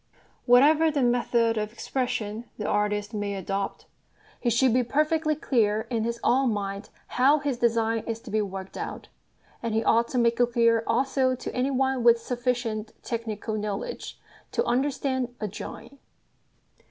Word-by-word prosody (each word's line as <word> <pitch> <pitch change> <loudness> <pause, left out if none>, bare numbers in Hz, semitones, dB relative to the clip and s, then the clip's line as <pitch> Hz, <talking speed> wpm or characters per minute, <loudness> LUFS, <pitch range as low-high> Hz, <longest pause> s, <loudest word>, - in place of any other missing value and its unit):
Whatever 295 +6 +6
the 290 -3 0
method 235 -2 +2
of 210 0 -3
expression 240 -3 -3
the 210 - -4
artist 210 +1 0
may 205 -1 -2
adopt, 195 +1 -3 0.5
he 240 - 0
should 235 +1 +3
be 250 0 +3
perfectly 305 +5 +1
clear 220 -7 +1
in 225 -2 0
his 235 0 -3
own 260 0 +3
mind 200 0 -4 0.2
how 270 +4 +3
his 280 -4 -2
design 230 -1 +2
is 225 -1 -3
to 225 - -10
be 215 0 +2
worked 195 -1 -6
out; - - -6 0.5
and 230 -2 -2
he 225 - +1
ought 230 +1 +3
to 255 - -3
make 235 -1 +2
it 240 -1 +2
clear 230 -1 +3
also 260 +1 +1
to - - -6
any 255 +2 +1
one 265 -2 0
with 235 0 +6
sufficient 235 -3 -2
technical 225 -2 -4
knowledge 210 -1 -4 0.3
to 470 - 0
understand 260 -1 -1
a 210 - -2
drawing. 235 +6 -9
235 Hz, 160 wpm, -26 LUFS, 215-255 Hz, 0.5 s, Whatever